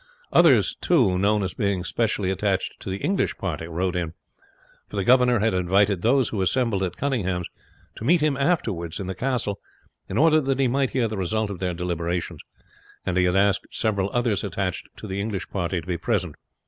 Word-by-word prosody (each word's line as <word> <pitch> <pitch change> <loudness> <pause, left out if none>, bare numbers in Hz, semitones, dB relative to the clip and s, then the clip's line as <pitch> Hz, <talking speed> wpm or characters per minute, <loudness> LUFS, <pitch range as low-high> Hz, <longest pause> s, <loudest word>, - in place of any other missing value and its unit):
Others, - - +5
too, 120 - +3
known 105 +1 +2
as 95 -2 -3
being 100 -3 -1
specially 105 -4 0
attached 95 - -1
to - - -7
the 95 - -2
English 190 - 0
party, 80 -4 -4
rode 90 +2 -2
in, 85 -2 -2 0.7
for - - -10
the 100 - 0
governor 125 +1 +5
had 110 +1 +1
invited 95 +1 +2
those 125 +3 +3
who 105 - -2
assembled 110 0 +1
at 90 -2 -2
Cunninghame's 95 -11 -1 0.5
to - - -7
meet 170 +8 +4
him 150 -2 +1
afterwards 115 - -1
in 100 - -4
the 95 - -3
castle 115 -2 -2 0.5
in - - -3
order 155 +1 +5
that 135 -1 -1
he 135 - +3
might 135 +1 +1
hear 125 -3 0
the 110 -1 -5
result 105 +3 -1
of 95 - -6
their 90 -2 -2
deliberations; 85 0 -3 0.6
and 90 - -1
he 90 0 +3
had 90 0 +1
asked 100 0 +2
several 100 -3 0
others 120 -5 0
attached 95 -2 -3
to - - -9
the 100 -1 -3
English 105 -2 -3
party 90 -2 -1
to 80 - -10
be 90 -2 -2
present. - - -1
100 Hz, 200 wpm, -24 LUFS, 90-120 Hz, 0.7 s, Others